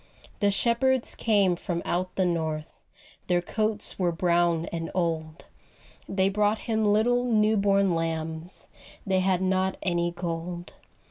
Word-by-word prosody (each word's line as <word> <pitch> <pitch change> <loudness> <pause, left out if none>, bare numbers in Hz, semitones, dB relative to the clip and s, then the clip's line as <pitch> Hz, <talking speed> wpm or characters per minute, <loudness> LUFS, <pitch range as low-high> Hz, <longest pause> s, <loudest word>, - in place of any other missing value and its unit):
The 205 - +3
shepherds 240 +5 +2
came 200 -5 +2
from 170 0 -4
out 180 +1 -2
the 190 - +2
north, 160 -3 -3 0.4
Their 180 -1 +3
coats 215 +4 -2
were 180 -2 +2
brown 170 -1 +1
and 165 -1 -3
old, 165 -3 -2 0.6
They 190 0 +2
brought 210 +2 +2
Him 220 -1 0
little 220 +4 +3
new 220 -3 +3
born 200 -2 +3
lambs 165 +1 -3 0.4
They 190 -1 +2
had 185 -1 +1
not 190 0 +1
any 175 -2 +1
gold. 175 0 -5
185 Hz, 135 wpm, -27 LUFS, 170-205 Hz, 0.6 s, The